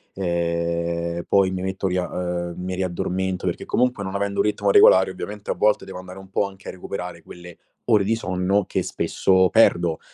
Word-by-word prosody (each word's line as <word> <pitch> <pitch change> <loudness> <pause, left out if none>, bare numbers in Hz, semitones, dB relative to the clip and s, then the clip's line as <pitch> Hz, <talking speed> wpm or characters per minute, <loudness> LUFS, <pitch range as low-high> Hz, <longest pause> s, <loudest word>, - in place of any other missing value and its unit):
ehm, 85 -1 -2
poi 95 -1 +3
mi 95 - -3
metto 95 +1 -3
lì 90 - -1
a 90 - -1
uhm, 90 -1 -3
mi 90 +1 -4
riaddormento, 95 0 -2
perché, - - -2
comunque, 125 -4 0
non 95 +1 -5
avendo 100 0 -2
u - - +4
ritmo 105 -1 +1
regolare, 95 -1 +6
ovviamente, 105 +2 -6
a - - +1
volte, 105 0 +1
devo 95 -1 -8
andare 90 +1 -10
un 95 -1 -14
po' 100 - +1
anche 95 0 -14
a - - -4
recuperare 90 -2 -7
quelle 90 0 -12 0.3
ore 105 -4 +4
di 115 +3 +1
sonno, 95 -1 0
che - - -1
spesso 95 -1 +2
perdo, 85 -7 +3
95 Hz, 195 wpm, -23 LUFS, 90-100 Hz, 0.3 s, regolare